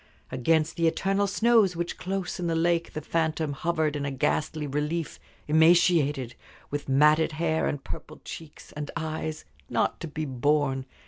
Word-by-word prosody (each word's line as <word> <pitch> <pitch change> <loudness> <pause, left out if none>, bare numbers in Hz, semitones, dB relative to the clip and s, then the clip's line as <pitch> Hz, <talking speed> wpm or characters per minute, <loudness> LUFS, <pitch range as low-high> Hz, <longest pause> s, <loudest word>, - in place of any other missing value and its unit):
Against 160 +4 +1
the 165 -1 +3
eternal 195 +4 +1
snows 215 -2 +3
which 170 +1 -4
close 190 -1 -3
in 175 - -1
the 165 - 0
lake 170 0 +1
the 155 - -4
phantom 160 -1 -1
hovered 160 0 0
in 145 - -2
a 140 - -1
ghastly 150 +3 -1
relief 150 +3 -2 0.3
emaciated, 160 -5 +4 0.4
with 145 -1 -4
matted 150 +4 +4
hair, 160 0 0
and 145 - -3
purpled 155 - -9
cheeks, 160 -3 -10
and 150 -1 -6
eyes 155 -1 -4 0.2
not - - 0
to 165 - -5
be 155 +1 -4
borne! 135 0 0
155 Hz, 155 wpm, -27 LUFS, 145-170 Hz, 0.4 s, emaciated